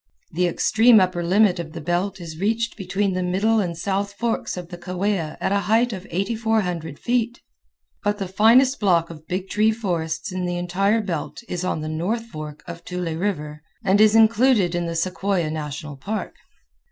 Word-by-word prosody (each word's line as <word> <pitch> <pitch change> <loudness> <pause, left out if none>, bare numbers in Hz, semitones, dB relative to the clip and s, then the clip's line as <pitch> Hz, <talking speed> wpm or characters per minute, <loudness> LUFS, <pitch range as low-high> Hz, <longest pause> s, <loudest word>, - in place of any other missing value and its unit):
The 180 +2 +1
extreme 220 +6 +5
upper 180 -2 +1
limit 190 +1 +3
of 160 -2 -6
the - - -6
belt 180 +5 -1
is 165 -2 -8
reached 225 +3 0
between 195 +1 -1
the 185 - -1
middle 195 +5 +2
and 175 -5 -2
south 200 +3 -2
forks 225 -2 -2
of 175 -1 -7
the 175 - -8
Kaweah 180 -2 -2
at - - -1
a 200 - +3
height 230 +2 +3
of 190 -1 -7
8400 190 -5 -1
feet, 240 0 -1 0.6
but 205 0 0
the 195 -2 -3
finest 235 +8 +4
block 170 -5 +2
of 155 -1 -12
big 185 +1 -3
tree 210 +3 +2
forests 175 -9 -3
in 185 -1 -2
the 175 0 -2
entire 195 +5 +1
belt 185 +3 -4
is 180 0 -3
on 180 -4 -1
the 155 - -4
north 180 +9 -2
fork 155 -6 -8
of 170 0 -8
Tule 180 -2 -3
River, 150 -5 -3 0.2
and 195 +2 +4
is 215 0 +6
included 225 -4 +4
in 175 -1 -1
the 165 - -3
Sequoia 185 -1 -1
National 150 -1 -5
Park. 210 +11 -4
185 Hz, 185 wpm, -23 LUFS, 170-215 Hz, 0.6 s, is